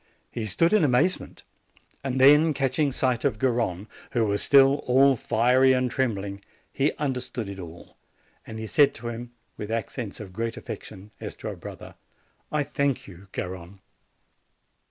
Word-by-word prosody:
He 110 -2 -4
stood 165 - +2
in 215 -5 +5
amazement; 150 +7 +1 0.6
then, 140 +4 +5
catching 140 +2 +1
sight 130 -2 0
of 105 - +1
Gar 130 +3 +2
rone, 105 -5 -2 0.3
who 115 -2 +2
was 100 -1 0
still 140 0 +6
all 135 +2 +5
fiery 125 +4 +3
and 125 -1 0
trembling, 100 -6 -2 0.3
he 140 +3 +2
understood 130 -6 -3
it 100 -1 -7
all, 85 -1 -11 0.5
and 110 - -8
he 110 - -5
said 145 +6 +4
to 120 +1 -6
him, 120 +1 -7 0.3
with 105 - -6
accents 115 -1 -4
of 100 -4 -9
great 115 +3 -3
affection, 100 +3 -9
as - - -6
to - - -6
a - - -6
brother, - - -10 0.6
"I 150 -1 +1
thank 140 -1 -1
you, 95 0 -13
Garrone." 90 +1 -6
120 Hz, 155 wpm, -26 LUFS, 105-135 Hz, 0.6 s, still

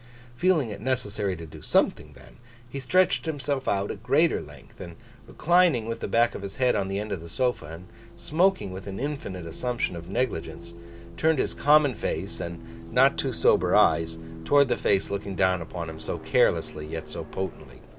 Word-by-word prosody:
Feeling 160 -5 +2
it 100 - -7
necessary 105 -6 -1
to 85 -1 -8
do 80 - -12
something - - +1
then, - - -17 0.3
he 140 +3 -6
stretched 180 +6 +2
himself 140 -3 -2
out 100 0 0
at 100 - -8
greater 140 +8 +2
length, - - -14
and, 85 -1 -8 0.3
reclining 170 -8 +3
with 115 0 -4
the - - -4
back 115 +3 +3
of - - -7
his 100 0 -7
head 125 -1 +2
on 95 - 0
the 95 0 -2
end 105 +1 -4
of 90 - -3
the 85 - -10
sofa, 125 - -1
and 85 +4 -10 0.3
smoking 180 - +1
with 95 +2 -8
an 95 -1 -5
infinite 130 - -4
assumption 115 +4 -2
of 85 +1 -9
negligence, 90 -7 -3 0.4
turned 160 -1 +2
his - - 0
common 145 -2 +4
face, - - -4
and 85 -1 -9
not - - +5
too - - -1
sober - - +3
eyes, 80 0 +3 0.3
towards 140 - +4
the 120 - +2
face 100 -1 +1
looking 100 -1 -4
down 95 -1 +2
upon 85 0 -6
him 80 0 -8
so - - -4
carelessly 75 0 +1
yet 80 0 -6
so - - -6
potently. 95 -2 -7
105 Hz, 190 wpm, -26 LUFS, 85-135 Hz, 0.4 s, not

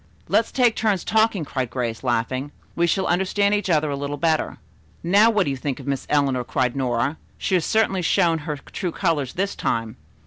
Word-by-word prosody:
"Let's 225 - +2
take 245 -3 +3
turns 210 -5 0
talking," 220 -6 +2
cried 130 -3 -3
Grace, 120 -1 -3
laughing. 130 +3 -1 0.2
"We 170 0 +2
shall 190 +3 +1
understand 190 +3 +1
each 205 -2 0
other 155 -3 +2
a - - -1
little 140 +1 -4
better." 160 +1 0 0.5
"Now, 200 +6 +5
what 210 -3 +2
do 145 - -2
you - - -2
think 135 0 -4
of - - -9
Miss 140 -2 -3
Eleanor?" 135 -4 +2
cried 125 0 -1
Nora. 130 +2 0 0.2
"She - - -2
has 180 -4 +2
certainly 220 -4 +1
shown 170 -2 +2
her 150 -1 -4
true 175 +5 -5
colors 160 -8 -1
this 195 +2 -1
time." 115 0 -2
155 Hz, 200 wpm, -23 LUFS, 135-195 Hz, 0.5 s, Now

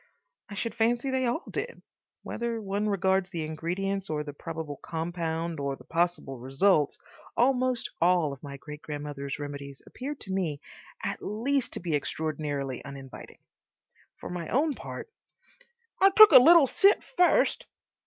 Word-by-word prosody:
I 200 - -7
should 225 +2 -3
fancy 240 +3 +1
they 260 -1 +1
all 245 +9 -1
did. 485 - -5 0.4
Whether 235 -1 -3
one 205 0 -2
regards 190 -1 +1
the 165 -4 -4
ingredients 180 +5 -3
or 150 -1 -1
the 145 -1 -7
probable 160 -1 -6
compound 165 -1 -3
or 140 -1 -2
the - - -16
possible 170 -6 -1
results, 145 +5 +2 0.4
almost 255 -1 +2
all 170 -4 +3
of 135 - -12
my 140 -1 -8
great 150 +3 -10
grandmother's 145 -2 -5
remedies 140 -1 -7
appear 280 +4 -6
to 200 -8 -8
me 165 -7 -1 0.4
at - - -3
least 240 +5 -1
to - - -2
be 170 -2 -3
extraordinarily 145 -3 -3
uninviting. 140 -2 -10 0.8
For - - -8
my 175 -2 -5
own 295 +4 +2
part— - - -8 0.9
"I 390 - +8
took 430 +1 +9
a 265 - +11
little 330 +3 +8
sip 395 +9 +4
first." 360 -5 +3
175 Hz, 150 wpm, -28 LUFS, 145-235 Hz, 0.9 s, a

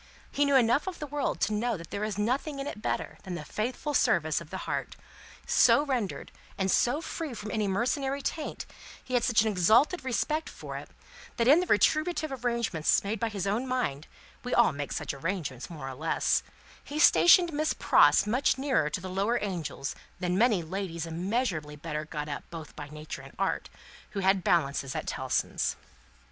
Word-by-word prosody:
He 290 - +2
knew 280 -1 +3
enough 250 +5 +4
of 370 - -4
the 300 - -5
world 290 0 -2
to 215 - +1
know 225 +1 0
that 165 -1 -11
there 200 - -3
is 215 -2 -2
nothing 260 +7 -1
in 275 - -4
it 210 - -6
better - - -3
than 185 -3 -6
the 150 - -6
faithful 250 - -3
service - - +2
of - - -11
the - - -6
heart; - - -3 0.5
so 290 - +5
rendered 230 - -2 0.3
and 190 -1 +1
so 285 +6 +2
free 320 -5 -5
from 210 -1 -6
any 215 -2 0
mercenary 265 +7 -1
taint, 310 -2 -4 0.4
he 255 - -8
had 245 -2 +3
such 225 -4 +4
an - - 0
exalted 220 - +3
respect 305 +5 -1
for - - -8
it, - - -7 0.5
that 230 - +2
in 295 +6 +7
the 365 - -1
retributive 310 - +2
arrangements 235 -10 +1
made 205 +2 -2
by 230 - 0
his 200 -3 -4
own 215 +6 -1
mind 205 - -2 0.4
we 250 - -1
all 240 - +5
make 145 0 -5
such - - -3
arrangements, 145 -3 -4
more 150 -6 -7
or - - -6
less 155 +5 +1 0.4
he 290 - -6
stationed 345 +2 +6
Miss 310 +1 0
Pross - - +5
much 250 +6 +2
nearer 265 - +1
to 165 - -3
the 190 - -6
lower 200 +6 0
Angels 170 -8 -4 0.3
than 180 0 0
many 215 -4 +3
ladies 170 -1 -4
immeasurably 170 -3 -2
better 150 0 -4
got 150 -1 -5
up 140 -3 -5
both 165 -3 -9
by 145 -1 -8
Nature 150 +1 -7
and - - -14
Art, - - -1 0.4
who 195 - -2
had 190 -1 +3
balances 140 -4 +1
at 155 - -3
Tellson's. 130 -1 -1
210 Hz, 190 wpm, -29 LUFS, 165-260 Hz, 0.5 s, in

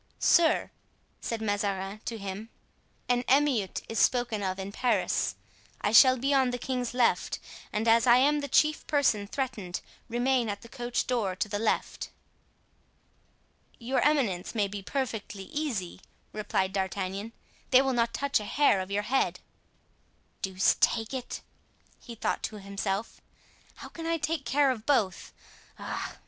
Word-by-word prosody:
"Sir," 335 -2 +3 0.5
said 225 -1 -3
Mazarin 205 -1 -2
to 230 - -3
him 200 +2 -6 0.6
"an 245 0 +2
emeute 265 -8 +2
is 225 - -2
spoken 240 -4 +2
of 190 -1 -2
in 195 +1 -5
Paris. 245 +3 0 0.4
I 205 - 0
shall 255 +3 +8
be 275 +3 0
on 265 -2 +4
the 245 - -2
king's 245 -1 -3
left 245 -2 +2 0.3
and 215 +2 -1
as 230 +1 +5
I 240 0 +8
am 290 +3 +4
the 285 - -3
chief 305 +2 +2
person 245 -9 +2
threatened, 220 -8 -3 0.3
remain 245 0 +1
at 205 0 -4
the 230 - -12
coach 245 -1 -2
door 220 -7 0
to 200 - -1
the 205 0 -3
left." 225 - -1 1.7
"Your 255 +2 -1
eminence 245 -11 +1
may 205 -2 +2
be 200 0 -6
perfectly 220 -4 -4
easy," 215 - -4 0.3
replied 190 -3 -1
D'Artagnan; 195 +2 -3 0.4
"they 260 0 +6
will 265 -1 0
not 235 -1 +1
touch 280 -1 0
a 210 - -6
hair 205 -5 +3
of 185 - -6
your 205 +1 -1
head." 265 +5 0 1.0
"Deuce 190 0 +2
take 225 +1 +2
it!" 255 -2 -5 0.6
he 235 - -10
thought - - -1
to 215 - -4
himself, 200 +1 -4 0.5
"how - - -10
can 330 0 -7
I 330 0 +1
take 305 -1 -2
care 280 -1 +3
of 225 -4 -6
both? 225 -10 +1 0.5
Ah! - - -5
230 Hz, 155 wpm, -28 LUFS, 200-265 Hz, 1.7 s, shall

